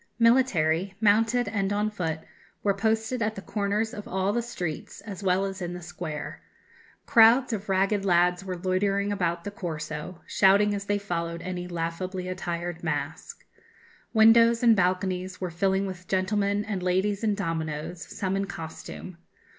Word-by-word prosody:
Military, 195 Hz, -7 st, +3 dB
mounted 225 Hz, +3 st, +3 dB
and 200 Hz, -2 st, -1 dB
on 210 Hz, +1 st, 0 dB
foot, 165 Hz, -6 st, -3 dB, 0.4 s
were 200 Hz, -, +3 dB
posted 220 Hz, +4 st, 0 dB
at 215 Hz, 0 st, 0 dB
the 195 Hz, -, -6 dB
corners 210 Hz, +1 st, -1 dB
of 210 Hz, -, -7 dB
all 190 Hz, +2 st, 0 dB
the 240 Hz, -, +1 dB
streets, 180 Hz, -9 st, -5 dB
as 205 Hz, -2 st, -8 dB
well 190 Hz, 0 st, +2 dB
as 195 Hz, 0 st, -5 dB
in 175 Hz, 0 st, -3 dB
the 180 Hz, -, -7 dB
square. 155 Hz, -3 st, -6 dB, 0.6 s
Crowds 235 Hz, +3 st, +6 dB
of 205 Hz, -1 st, -4 dB
ragged 195 Hz, +1 st, +2 dB
lads 180 Hz, 0 st, +3 dB
were 185 Hz, -2 st, -4 dB
loitering 195 Hz, +3 st, 0 dB
about 170 Hz, -4 st, -1 dB
the 205 Hz, -, -5 dB
Corso, 160 Hz, -2 st, -5 dB
shouting 205 Hz, +1 st, +4 dB
as 200 Hz, 0 st, -3 dB
they 205 Hz, 0 st, +1 dB
followed 170 Hz, -4 st, -3 dB
any 180 Hz, -1 st, -4 dB
laughably 180 Hz, +2 st, -3 dB
attired 175 Hz, -2 st, -4 dB
mask. 160 Hz, -, -4 dB, 0.7 s
Windows 230 Hz, +1 st, +6 dB
and 230 Hz, -2 st, +7 dB
balconies 185 Hz, 0 st, 0 dB
were 180 Hz, -2 st, -3 dB
filling 190 Hz, +3 st, +1 dB
with 180 Hz, -2 st, -7 dB
gentlemen 200 Hz, +2 st, 0 dB
and 205 Hz, -4 st, -3 dB
ladies 190 Hz, +3 st, 0 dB
in 210 Hz, -2 st, +2 dB
dominoes, 165 Hz, -2 st, -3 dB
some 190 Hz, +1 st, -3 dB
in 195 Hz, 0 st, 0 dB
costume. 170 Hz, 0 st, -8 dB
190 Hz, 155 wpm, -27 LUFS, 175-205 Hz, 0.7 s, and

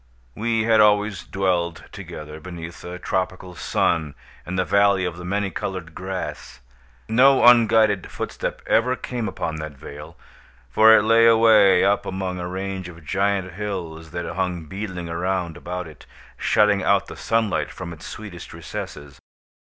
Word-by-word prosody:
We 115 Hz, -, 0 dB
had 110 Hz, -1 st, +4 dB
always 105 Hz, -3 st, +3 dB
dwelled 90 Hz, -3 st, -1 dB
together, 75 Hz, 0 st, -9 dB
beneath 85 Hz, 0 st, -9 dB
a 90 Hz, +1 st, -6 dB
tropical 90 Hz, 0 st, -3 dB
sun, 80 Hz, -4 st, 0 dB, 0.3 s
in 90 Hz, -, -4 dB
the 90 Hz, 0 st, +1 dB
Valley 100 Hz, -2 st, +3 dB
of 90 Hz, -2 st, -3 dB
the 90 Hz, -, -8 dB
Many 100 Hz, +2 st, -1 dB
Colored 85 Hz, -1 st, -5 dB
Grass. 95 Hz, -10 st, -6 dB, 0.5 s
No 130 Hz, +4 st, +5 dB
unguided 110 Hz, -4 st, +5 dB
footstep -, -, -5 dB
ever 125 Hz, +3 st, +2 dB
came 120 Hz, -3 st, -4 dB
upon 80 Hz, -4 st, -4 dB
that 75 Hz, -1 st, -6 dB
vale; 75 Hz, +5 st, -10 dB, 0.5 s
for 110 Hz, -, +7 dB
it -, -, +2 dB
lay 115 Hz, +1 st, +5 dB
away 110 Hz, -5 st, +6 dB
up 100 Hz, +1 st, +1 dB
among 95 Hz, -1 st, -3 dB
a 90 Hz, -, -4 dB
range 95 Hz, 0 st, -5 dB
of 80 Hz, -2 st, -14 dB
giant 95 Hz, +1 st, 0 dB
hills 85 Hz, -5 st, -5 dB
that 85 Hz, +2 st, -5 dB
hung 90 Hz, -3 st, -2 dB
beetling 95 Hz, 0 st, -6 dB
around 85 Hz, 0 st, -2 dB
about 90 Hz, +2 st, -5 dB
it, 80 Hz, -, -15 dB, 0.3 s
shutting 105 Hz, -1 st, +3 dB
out 100 Hz, +1 st, +2 dB
the -, -, -10 dB
sunlight 115 Hz, -3 st, 0 dB
from 85 Hz, -1 st, -7 dB
its 80 Hz, -, -11 dB
sweetest 100 Hz, -6 st, -9 dB
recesses. 70 Hz, -1 st, -8 dB
95 Hz, 150 wpm, -23 LUFS, 85-105 Hz, 0.5 s, for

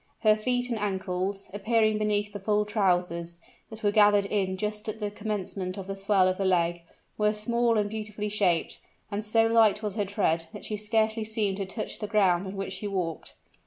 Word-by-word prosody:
Her 215 Hz, -1 st, +5 dB
feet 245 Hz, +3 st, 0 dB
and 230 Hz, -, -1 dB
ankles, 195 Hz, -1 st, -2 dB
appearing 215 Hz, +1 st, +2 dB
beneath 210 Hz, -1 st, 0 dB
the 205 Hz, -, -5 dB
full 210 Hz, +1 st, +1 dB
trousers, 180 Hz, -5 st, 0 dB, 0.3 s
that 220 Hz, 0 st, -10 dB
were 205 Hz, -, +3 dB
gathered 205 Hz, -1 st, +5 dB
in 195 Hz, -2 st, -1 dB
just 210 Hz, +2 st, -3 dB
at 215 Hz, +1 st, -5 dB
the 210 Hz, -1 st, -3 dB
commencement 200 Hz, -3 st, -4 dB
of 195 Hz, -, -6 dB
the 195 Hz, 0 st, -5 dB
swell 195 Hz, -1 st, +3 dB
of 185 Hz, +1 st, -1 dB
the -, -, +1 dB
leg, 175 Hz, -2 st, +1 dB, 0.4 s
were 210 Hz, 0 st, +3 dB
small 235 Hz, +2 st, +1 dB
and 210 Hz, -1 st, +1 dB
beautifully 210 Hz, 0 st, -4 dB
shaped; 195 Hz, -6 st, +1 dB, 0.3 s
and 205 Hz, +1 st, -2 dB
so 225 Hz, +1 st, +3 dB
light 225 Hz, -2 st, +4 dB
was 210 Hz, 0 st, -3 dB
her 205 Hz, -, +1 dB
tread, 170 Hz, -5 st, 0 dB
that -, -, -8 dB
she 215 Hz, -, -3 dB
scarcely 220 Hz, +1 st, 0 dB
seemed 215 Hz, -3 st, -1 dB
to 195 Hz, -2 st, -3 dB
touch 215 Hz, +3 st, -4 dB
the 210 Hz, -, -3 dB
ground 195 Hz, -3 st, +2 dB
on 190 Hz, -, -6 dB
which 195 Hz, -1 st, -4 dB
she 195 Hz, +2 st, -4 dB
walked. 180 Hz, -5 st, -4 dB
205 Hz, 200 wpm, -27 LUFS, 190-215 Hz, 0.4 s, Her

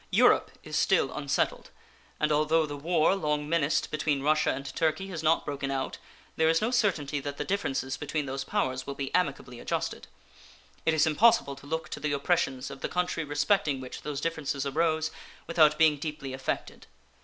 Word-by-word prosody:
Europe -, -, +4 dB
is -, -, -6 dB
still -, -, +2 dB
unsettled, -, -, -1 dB, 0.5 s
and 150 Hz, 0 st, +1 dB
although 155 Hz, +2 st, +3 dB
the 145 Hz, -1 st, -6 dB
war 160 Hz, +4 st, +2 dB
long 150 Hz, -4 st, -1 dB
menaced 155 Hz, -2 st, +1 dB
between 150 Hz, -2 st, 0 dB
Russia 155 Hz, +1 st, +3 dB
and 135 Hz, +1 st, -6 dB
Turkey 160 Hz, +4 st, 0 dB
has 170 Hz, -5 st, -4 dB
not 160 Hz, +1 st, +2 dB
broken 140 Hz, -1 st, -3 dB
out, 135 Hz, -1 st, -3 dB, 0.4 s
there 160 Hz, 0 st, +4 dB
is 165 Hz, 0 st, +4 dB
no 225 Hz, +3 st, 0 dB
certainty 170 Hz, -, +1 dB
that 140 Hz, 0 st, -5 dB
the -, -, -3 dB
differences 135 Hz, -9 st, -1 dB
between 150 Hz, 0 st, -2 dB
those 135 Hz, 0 st, -3 dB
powers 130 Hz, -1 st, -1 dB
will 140 Hz, -, -4 dB
be 135 Hz, -1 st, -4 dB
amicably 140 Hz, -8 st, -1 dB
adjusted. -, -, -3 dB, 0.8 s
It 160 Hz, -, +4 dB
is 155 Hz, -, +4 dB
impossible 160 Hz, -3 st, +4 dB
to 140 Hz, +1 st, -14 dB
look 160 Hz, +2 st, -2 dB
to -, -, -5 dB
the 145 Hz, 0 st, -1 dB
oppressions 140 Hz, -3 st, 0 dB
of 135 Hz, -, -10 dB
the -, -, -2 dB
country 180 Hz, -2 st, -1 dB
respecting 145 Hz, 0 st, +1 dB
which 130 Hz, -1 st, -8 dB
those 145 Hz, -2 st, -4 dB
differences 145 Hz, -4 st, -2 dB
arose 155 Hz, +2 st, +1 dB, 0.3 s
without 155 Hz, -2 st, +4 dB
being 155 Hz, -2 st, +5 dB
deeply 145 Hz, -3 st, -5 dB
affected. 130 Hz, 0 st, -4 dB
150 Hz, 180 wpm, -28 LUFS, 140-160 Hz, 0.8 s, being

